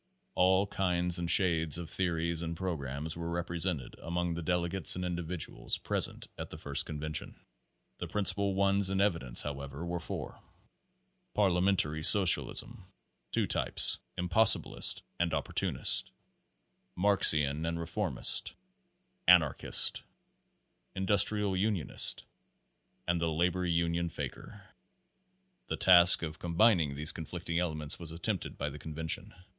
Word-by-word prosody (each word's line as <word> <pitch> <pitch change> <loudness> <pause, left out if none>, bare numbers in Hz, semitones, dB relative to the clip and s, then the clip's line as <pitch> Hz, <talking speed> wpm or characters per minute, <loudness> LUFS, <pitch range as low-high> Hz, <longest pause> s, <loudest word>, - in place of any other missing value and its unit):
\s 185 +1 -47 0.2
All 95 +2 +2
kinds 90 -3 +2
and 85 -1 -4
shades 85 -5 +1
of 85 -1 -7
theories 85 -2 -1
and 85 0 -5
programs 80 -4 -5
were 85 0 -6
represented 85 -4 -3
among 85 0 -3
the 85 - -5
delegates 90 +2 0
and 90 0 -4
individuals 85 -2 -3
pres - - 0
ent - - -13
at - - -6
the - - -8
first - - -1
convention. 75 +1 -5 0.6
The - - -5
principal 100 -1 -1
ones 100 0 +2
in 95 - -2
evi 100 -4 +1
dence, - - -2
however, 70 +2 -7
were 85 0 -4
four: 85 - -7 0.9
Parliamentary 90 -5 +1
socialists 95 0 +5 0.7
two - - -1
types - - +1 0.2
impossibilist 90 +5 +4 0.2
and 85 -2 -1
opportunist, 70 - -1 0.9
Marxian 80 -7 +3
and 85 0 -3
reformist; 85 0 +1 0.7
anarchist; 85 -5 +3 0.9
industrial 100 +1 +2
unionist; 95 - +2 0.8
and 85 -1 -1
the 85 - 0
labor 90 +3 -1
union 85 0 -1
faker. 100 +4 -9 1.0
The - - -4
task 90 -1 +6
of 80 -1 -6
combining 85 -4 +1
these 75 +2 +4
conflicting 85 +1 -5
elements 75 -4 -3
was 85 -2 -3
attempted 85 +1 -3
by 70 +1 -4
the 75 - -10
convention. 80 +2 -3
85 Hz, 125 wpm, -30 LUFS, 80-95 Hz, 1.0 s, task